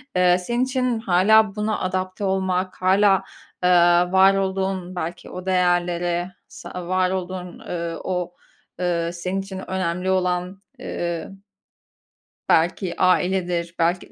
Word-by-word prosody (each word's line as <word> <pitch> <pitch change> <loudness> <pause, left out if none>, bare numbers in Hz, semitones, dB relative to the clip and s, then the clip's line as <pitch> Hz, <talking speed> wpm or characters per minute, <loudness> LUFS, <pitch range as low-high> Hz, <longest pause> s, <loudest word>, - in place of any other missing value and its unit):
eee, 180 0 +4
senin 240 +7 -1
için 255 -3 0
hâlâ 215 +2 +4
buna 210 0 -1
adapte 185 +1 -3
olmak, 190 -1 -1
hâlâ, 195 +1 +4 0.4
eee, 180 - +4 0.4
var 190 +1 +6
olduğun, 190 -1 -2
belki 175 0 -5
o 185 0 -8
değerlere, 175 -1 +1 0.2
sa 180 -1 -8
var 185 0 +1
olduğun, 185 -1 -5
eee, 170 -1 -4
o, 180 -1 -3 0.5
eee, 170 -2 0
senin 185 +2 -3
için 190 -1 -7
önemli 185 0 -1
olan, 180 +1 -1 0.2
eee 170 -1 -4 1.2
belki 170 +2 +1
ailedir, 180 -2 +1
belki 170 +2 0
185 Hz, 120 wpm, -22 LUFS, 175-190 Hz, 1.2 s, var